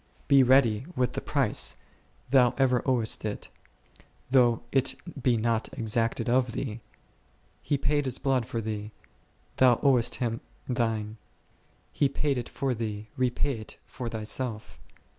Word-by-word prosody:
Be 140 Hz, -1 st, +6 dB
ready 125 Hz, -2 st, +4 dB
with 125 Hz, -2 st, 0 dB
the -, -, -3 dB
price; -, -, +1 dB, 0.5 s
thou 125 Hz, -2 st, +5 dB
ever 125 Hz, -2 st, +3 dB
owest 120 Hz, -4 st, +1 dB
it, 105 Hz, -1 st, -5 dB, 0.8 s
though 120 Hz, -3 st, +4 dB
it 135 Hz, -1 st, +2 dB, 0.3 s
be 120 Hz, -2 st, +2 dB
not 115 Hz, 0 st, 0 dB
exacted 115 Hz, 0 st, 0 dB
of 125 Hz, -1 st, +2 dB
thee: 115 Hz, -3 st, -4 dB, 0.8 s
He 145 Hz, 0 st, 0 dB
paid 145 Hz, +1 st, 0 dB
His 130 Hz, -1 st, -1 dB
blood 130 Hz, -4 st, 0 dB
for 115 Hz, -, -3 dB
thee, 105 Hz, -1 st, -5 dB, 0.6 s
thou 125 Hz, -2 st, +5 dB
owest 130 Hz, -5 st, +4 dB
Him 115 Hz, -3 st, -2 dB, 0.3 s
thine; 115 Hz, -3 st, -1 dB, 0.8 s
He 140 Hz, -, +2 dB
paid 140 Hz, -1 st, -1 dB
it 120 Hz, -, -6 dB
for 135 Hz, -2 st, -1 dB
thee, 110 Hz, -2 st, -5 dB
repay 130 Hz, 0 st, 0 dB
it 110 Hz, -, -10 dB
for 120 Hz, -2 st, -6 dB
thyself. 110 Hz, +1 st, -4 dB
120 Hz, 140 wpm, -28 LUFS, 110-130 Hz, 0.8 s, Be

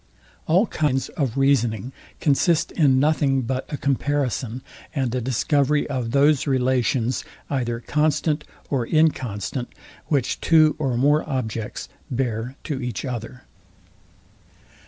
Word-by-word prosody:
All 180 Hz, +7 st, +4 dB
kinds 145 Hz, -, -1 dB
of 135 Hz, -5 st, -2 dB
reasoning 125 Hz, -3 st, +1 dB, 0.3 s
consist 155 Hz, +3 st, +2 dB
in 135 Hz, -6 st, +3 dB
nothing 140 Hz, -2 st, +2 dB
but 130 Hz, +2 st, -3 dB
a 145 Hz, -, -2 dB
comparison, 135 Hz, -3 st, -1 dB, 0.3 s
and 130 Hz, -4 st, 0 dB
a 125 Hz, -, -1 dB
discovery 140 Hz, +4 st, +1 dB
of 130 Hz, -5 st, -2 dB
those 140 Hz, +3 st, +3 dB
relations, 130 Hz, -2 st, +1 dB, 0.3 s
either 120 Hz, -4 st, -1 dB
constant 150 Hz, +2 st, +1 dB, 0.3 s
or 125 Hz, -5 st, 0 dB
inconstant, 130 Hz, -, 0 dB, 0.4 s
which 140 Hz, -5 st, 0 dB
two 155 Hz, -2 st, +5 dB
or 135 Hz, -5 st, 0 dB
more 145 Hz, +4 st, +3 dB
objects 115 Hz, -5 st, -3 dB, 0.2 s
bear 125 Hz, -1 st, -2 dB
to 140 Hz, -4 st, -3 dB
each 125 Hz, -1 st, -4 dB
other. 125 Hz, -1 st, -6 dB
135 Hz, 115 wpm, -23 LUFS, 125-145 Hz, 0.4 s, two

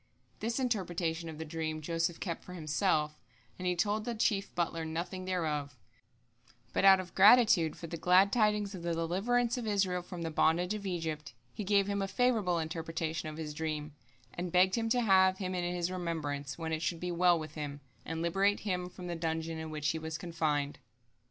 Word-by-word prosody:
This 230 Hz, +1 st, -2 dB
interpretation 175 Hz, -8 st, -1 dB
of 155 Hz, -, -8 dB
the 160 Hz, -, -5 dB
dream 155 Hz, 0 st, -3 dB
Joseph 165 Hz, +1 st, -1 dB
kept 170 Hz, -4 st, -4 dB
for 180 Hz, -, -9 dB
himself, 155 Hz, -2 st, 0 dB, 0.4 s
and 180 Hz, -, -2 dB
he 180 Hz, -, +2 dB
told 210 Hz, +4 st, 0 dB
the 235 Hz, +1 st, -3 dB
chief 205 Hz, -3 st, 0 dB
butler 165 Hz, -1 st, -1 dB
nothing 170 Hz, +4 st, -4 dB
thereof, 150 Hz, -6 st, -2 dB, 1.0 s
but -, -, +1 dB
out 195 Hz, -1 st, +8 dB
of 180 Hz, -2 st, -7 dB
gratitude 200 Hz, -6 st, +6 dB
for -, -, -8 dB
the 165 Hz, +1 st, -5 dB
glad 185 Hz, +4 st, +4 dB
tidings 210 Hz, -3 st, +2 dB
of 185 Hz, -, -7 dB
the 170 Hz, 0 st, -1 dB
deliverance 230 Hz, +9 st, +1 dB
of 230 Hz, -, -5 dB
Israel 195 Hz, -3 st, +1 dB
from 175 Hz, -1 st, -7 dB
the 165 Hz, -, -3 dB
bondage 175 Hz, +5 st, +2 dB
of 205 Hz, -2 st, -4 dB
Egypt, 160 Hz, -6 st, -4 dB, 0.2 s
he 210 Hz, -, -4 dB
gave 200 Hz, 0 st, +3 dB
him 200 Hz, 0 st, -1 dB
a 195 Hz, -, -1 dB
favorable 215 Hz, -5 st, +2 dB
interpretation 165 Hz, 0 st, -3 dB
of 155 Hz, -, -8 dB
his 155 Hz, -2 st, -5 dB
dream, 155 Hz, -1 st, -3 dB, 0.4 s
and 175 Hz, 0 st, -4 dB
begged 185 Hz, +2 st, +4 dB
him 225 Hz, -1 st, 0 dB
to 245 Hz, +2 st, +3 dB
have 190 Hz, -3 st, +5 dB
him 185 Hz, -1 st, -3 dB
in 175 Hz, -1 st, -1 dB
his 175 Hz, 0 st, -1 dB
remembrance, 150 Hz, -6 st, -3 dB
when 160 Hz, -1 st, -3 dB
it 160 Hz, -, -1 dB
should 170 Hz, 0 st, -1 dB
be 180 Hz, +1 st, -3 dB
well 175 Hz, 0 st, +4 dB
with 155 Hz, -1 st, -6 dB
him, 145 Hz, -2 st, -5 dB, 0.2 s
and 165 Hz, +1 st, -4 dB
liberate 195 Hz, +4 st, +2 dB
him 180 Hz, -3 st, -2 dB
from 180 Hz, 0 st, -10 dB
the 175 Hz, -1 st, -3 dB
dungeon 160 Hz, 0 st, -2 dB
in 160 Hz, 0 st, -5 dB
which 150 Hz, -1 st, -1 dB
he 160 Hz, -, -1 dB
was 160 Hz, 0 st, -4 dB
confined. 155 Hz, -4 st, -1 dB
175 Hz, 200 wpm, -32 LUFS, 160-195 Hz, 1.0 s, out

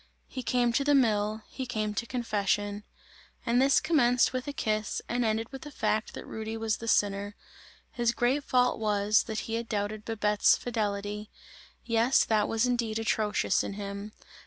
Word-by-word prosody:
He 260 Hz, -, -6 dB
came 245 Hz, -1 st, +1 dB
to 275 Hz, -, +2 dB
the 290 Hz, +1 st, +3 dB
mill, 215 Hz, -4 st, +2 dB
he 260 Hz, -2 st, -6 dB
came 215 Hz, -3 st, -2 dB
to 235 Hz, +3 st, -3 dB
confession; 205 Hz, -3 st, -1 dB, 0.6 s
and 240 Hz, +1 st, +3 dB
this 275 Hz, 0 st, +5 dB
commenced 255 Hz, -8 st, +3 dB
with 255 Hz, +2 st, -3 dB
a -, -, -2 dB
kiss, 215 Hz, -5 st, -1 dB
and 245 Hz, +1 st, 0 dB
ended 220 Hz, +1 st, -1 dB
with 270 Hz, -1 st, -8 dB
the 295 Hz, -, -8 dB
fact 220 Hz, -5 st, -1 dB
that -, -, -7 dB
Rudy 220 Hz, 0 st, -5 dB
was 220 Hz, -1 st, -1 dB
the 230 Hz, -, -8 dB
sinner; 205 Hz, -1 st, +1 dB, 0.6 s
his 235 Hz, -1 st, +1 dB
great 245 Hz, +5 st, +1 dB
fault 250 Hz, -3 st, +2 dB
was, 210 Hz, -1 st, +2 dB
that 220 Hz, -1 st, -3 dB
he 225 Hz, -, -6 dB
had 230 Hz, 0 st, -3 dB
doubted 210 Hz, 0 st, -2 dB
Babette's 210 Hz, -2 st, +2 dB
fidelity; 210 Hz, -2 st, -3 dB, 0.6 s
yes, 230 Hz, +2 st, +3 dB
that 215 Hz, -2 st, +2 dB
was 225 Hz, +1 st, +1 dB
indeed 235 Hz, -3 st, 0 dB
atrocious 215 Hz, -2 st, +1 dB
in -, -, -4 dB
him! 200 Hz, +1 st, -6 dB
220 Hz, 175 wpm, -29 LUFS, 210-245 Hz, 0.6 s, this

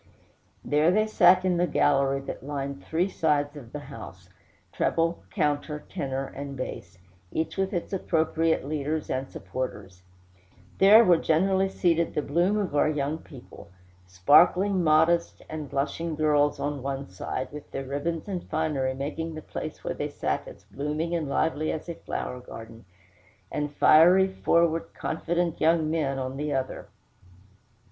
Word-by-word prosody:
There 150 Hz, +3 st, +3 dB
they 215 Hz, +4 st, +3 dB
sat 185 Hz, -3 st, +5 dB
in 180 Hz, -2 st, +2 dB
the 175 Hz, +1 st, +2 dB
gallery 135 Hz, -3 st, +2 dB
that 135 Hz, -, -7 dB
lined 140 Hz, -1 st, -5 dB
three 170 Hz, +4 st, 0 dB
sides 150 Hz, -5 st, 0 dB
of 125 Hz, -6 st, -11 dB
the 150 Hz, -, -6 dB
house, -, -, -11 dB, 0.4 s
treble, 165 Hz, +1 st, 0 dB
counter, 150 Hz, -3 st, -1 dB
tenor, 135 Hz, -6 st, -3 dB
and 140 Hz, 0 st, -7 dB
bass, 125 Hz, -7 st, -6 dB, 0.3 s
each 160 Hz, 0 st, -2 dB
with 190 Hz, 0 st, -1 dB
its 175 Hz, +1 st, -4 dB
appropriate 165 Hz, -4 st, +1 dB
leaders 155 Hz, +1 st, -2 dB
and 130 Hz, +1 st, -2 dB
supporters; 100 Hz, -8 st, -6 dB, 0.8 s
there 210 Hz, +4 st, +8 dB
were 175 Hz, -3 st, +6 dB
generally 190 Hz, +5 st, +2 dB
seated 170 Hz, -3 st, +1 dB
the 150 Hz, -, 0 dB
bloom 175 Hz, +9 st, +1 dB
of 195 Hz, -8 st, -2 dB
our 150 Hz, -, +3 dB
young 150 Hz, +1 st, -2 dB
people; 130 Hz, -9 st, -13 dB, 0.4 s
sparkling, 175 Hz, -, +4 dB
modest, 160 Hz, +2 st, +2 dB
and 155 Hz, -3 st, -6 dB
blushing 155 Hz, +4 st, -2 dB
girls 150 Hz, -1 st, +2 dB
on 145 Hz, -1 st, -3 dB
one 135 Hz, +1 st, -4 dB
side, 125 Hz, +7 st, -5 dB
with 150 Hz, 0 st, -9 dB
their 135 Hz, -, -5 dB
ribbons 150 Hz, +6 st, -3 dB
and 185 Hz, -3 st, -5 dB
finery, 150 Hz, -5 st, -1 dB
making 155 Hz, +4 st, -4 dB
the 155 Hz, -, -8 dB
place -, -, -7 dB
where -, -, -2 dB
they -, -, -4 dB
sat -, -, -2 dB
as -, -, -12 dB
blooming 150 Hz, +4 st, -3 dB
and 160 Hz, -4 st, -1 dB
lively 155 Hz, +1 st, 0 dB
as 155 Hz, -, -5 dB
a 170 Hz, -, -4 dB
flower 125 Hz, -5 st, -5 dB
garden, 115 Hz, -2 st, -11 dB, 0.7 s
and 145 Hz, 0 st, -3 dB
fiery, 180 Hz, +7 st, +6 dB
forward, 170 Hz, -3 st, +1 dB
confident 170 Hz, +1 st, -2 dB
young 160 Hz, -1 st, +3 dB
men 145 Hz, -4 st, 0 dB
on 130 Hz, 0 st, -4 dB
the 150 Hz, +1 st, -2 dB
other. 130 Hz, -1 st, -3 dB
155 Hz, 155 wpm, -26 LUFS, 140-170 Hz, 0.8 s, there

